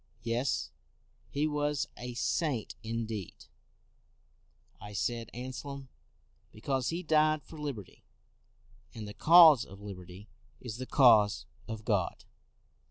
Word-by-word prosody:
" 115 Hz, -, -34 dB
Yes, 125 Hz, +4 st, -1 dB, 0.6 s
he 145 Hz, +2 st, 0 dB
was 150 Hz, -1 st, -1 dB
a 125 Hz, 0 st, -7 dB
saint 135 Hz, -2 st, -1 dB
indeed,' 110 Hz, -4 st, -5 dB, 1.3 s
1 105 Hz, 0 st, -9 dB
said 115 Hz, +2 st, -2 dB
Anselm, 130 Hz, +2 st, -7 dB, 0.3 s
" -, -, -40 dB
because 130 Hz, +3 st, -2 dB
he 170 Hz, +2 st, -3 dB
died 155 Hz, -1 st, +3 dB
for 160 Hz, -, -12 dB
liberty; 135 Hz, -10 st, -7 dB, 0.9 s
and 110 Hz, -2 st, -7 dB
the 105 Hz, -, -8 dB
cause 160 Hz, -5 st, +8 dB
of 95 Hz, +1 st, -12 dB
liberty 95 Hz, -1 st, -10 dB, 0.3 s
is 115 Hz, -3 st, -7 dB
the 130 Hz, 0 st, -6 dB
cause 110 Hz, -7 st, +5 dB, 0.2 s
of 110 Hz, -1 st, -7 dB
God. 100 Hz, -6 st, -1 dB
120 Hz, 120 wpm, -31 LUFS, 105-145 Hz, 1.3 s, cause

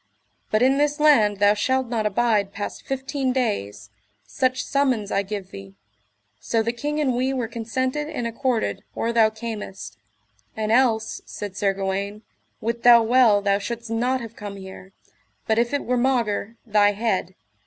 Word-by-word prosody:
But 215 Hz, +2 st, +2 dB
in 270 Hz, +2 st, +3 dB
this 295 Hz, +1 st, +1 dB
land 225 Hz, -10 st, +4 dB
thou 205 Hz, +1 st, +5 dB
shalt 260 Hz, +5 st, 0 dB
not 225 Hz, -3 st, 0 dB
abide 210 Hz, -2 st, +1 dB
past 205 Hz, -, -5 dB
fifteen 270 Hz, 0 st, -2 dB
days, 105 Hz, -, -2 dB, 0.3 s
such 255 Hz, -, 0 dB
summons 255 Hz, -7 st, 0 dB
I 195 Hz, -, +2 dB
give 200 Hz, -1 st, -6 dB
thee: 95 Hz, 0 st, -10 dB, 0.6 s
so 225 Hz, -, 0 dB
the 230 Hz, +1 st, -1 dB
king 295 Hz, +5 st, -3 dB
and 275 Hz, -4 st, +1 dB
we 260 Hz, +2 st, 0 dB
were 245 Hz, -3 st, -2 dB
consented 255 Hz, +6 st, -3 dB
and 265 Hz, -7 st, -4 dB
accorded 235 Hz, 0 st, -1 dB
or 230 Hz, +1 st, -1 dB
thou 225 Hz, -2 st, +5 dB
camest. 220 Hz, -3 st, -7 dB, 0.6 s
And 215 Hz, 0 st, -1 dB
else, 230 Hz, -2 st, +2 dB
said 205 Hz, -2 st, -7 dB
Sir 200 Hz, -1 st, +1 dB
Gawaine, 200 Hz, +2 st, -3 dB, 0.4 s
wit 235 Hz, +1 st, -2 dB
thou 235 Hz, -1 st, +7 dB
well 225 Hz, -3 st, +4 dB
thou 200 Hz, 0 st, +2 dB
shouldst 235 Hz, +2 st, -6 dB
not 250 Hz, +3 st, 0 dB
have 230 Hz, -1 st, -9 dB
come 205 Hz, -2 st, -7 dB
here, 190 Hz, 0 st, -11 dB, 0.5 s
but 220 Hz, 0 st, +2 dB
if 235 Hz, 0 st, +1 dB
it 285 Hz, -, -2 dB
were 250 Hz, 0 st, +1 dB
maugre 235 Hz, -4 st, 0 dB
thy 205 Hz, -2 st, +3 dB
head. 195 Hz, -4 st, -1 dB
230 Hz, 165 wpm, -23 LUFS, 205-255 Hz, 0.6 s, thou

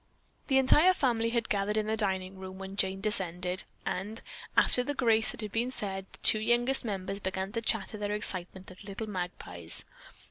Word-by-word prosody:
The 265 Hz, -, +3 dB
entire 300 Hz, +8 st, +6 dB
family 235 Hz, -6 st, +1 dB
had 230 Hz, -1 st, 0 dB
gathered 205 Hz, +1 st, 0 dB
in 215 Hz, -, +1 dB
the 220 Hz, +1 st, 0 dB
dining 190 Hz, -3 st, -2 dB
room 190 Hz, 0 st, -8 dB
when 195 Hz, 0 st, -7 dB
Jane 195 Hz, -1 st, 0 dB
descended, 180 Hz, -3 st, +2 dB, 0.2 s
and, 205 Hz, +5 st, -3 dB, 0.4 s
after 250 Hz, -, +4 dB
the 290 Hz, +3 st, -3 dB
grace 225 Hz, -4 st, +3 dB
had 215 Hz, -2 st, -4 dB
been 235 Hz, +3 st, 0 dB
said, 195 Hz, -6 st, -4 dB
the -, -, -11 dB
two 215 Hz, -, +6 dB
youngest 240 Hz, +4 st, +3 dB
members 195 Hz, -3 st, -3 dB
began 190 Hz, 0 st, -3 dB
to 230 Hz, -, -2 dB
chatter 220 Hz, -1 st, -1 dB
their 205 Hz, 0 st, -1 dB
excitement 185 Hz, -2 st, -5 dB
like 185 Hz, -, -12 dB
little 200 Hz, +2 st, -5 dB
magpies. 175 Hz, -, -5 dB
205 Hz, 180 wpm, -30 LUFS, 190-225 Hz, 0.4 s, entire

